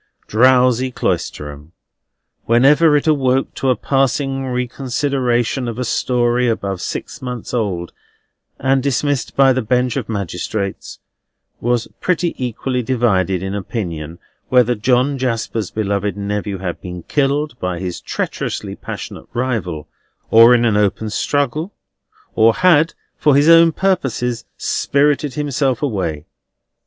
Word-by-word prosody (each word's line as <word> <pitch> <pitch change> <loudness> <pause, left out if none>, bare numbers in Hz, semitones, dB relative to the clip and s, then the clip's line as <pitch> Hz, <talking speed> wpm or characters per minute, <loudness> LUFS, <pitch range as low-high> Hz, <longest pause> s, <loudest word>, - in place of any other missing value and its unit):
Drowsy 125 +2 +3
Cloisterham, 75 - -4 0.7
whenever 145 +6 +5
it 145 - -2
awoke 135 -4 +1
to 135 - -1
a 130 - +3
passing 135 +2 0
reconsideration 125 0 -1
of 115 -1 -4
a 125 - -2
story 120 +1 +1
above 100 -5 -2
six - - -5
months 125 -3 -6
old 95 -8 -2 0.6
and 135 +1 +1
dismissed 140 0 -1
by 135 -1 +5
the 130 - 0
bench 125 +2 0
of 120 -5 -4
magistrates, 100 0 -4 0.6
was 120 -1 0
pretty 175 -1 0
equally 125 +1 -2
divided 105 -7 +1
in 95 0 -3
opinion 85 -6 -5 0.3
whether 125 -1 +4
John 125 +5 +1
Jasper's 115 -4 -2
beloved 100 -2 -2
nephew 100 0 -3
had 90 -2 -5
been 90 -1 -7
killed 145 -1 -1
by 90 -1 -2
his 90 0 -5
treacherously - - -4
passionate - - -8
rival, 110 - -2 0.4
or 115 +2 +8
in 120 0 +2
an 110 -3 +2
open 105 +1 0
struggle; 145 - -1 0.6
or 115 0 +4
had, 165 -3 +4 0.2
for 150 -2 +4
his 145 +2 +4
own 165 0 +7
purposes, 135 - -1
spirited 145 0 +1
himself 140 -3 -1
away. 90 - -2
125 Hz, 125 wpm, -18 LUFS, 105-135 Hz, 0.7 s, or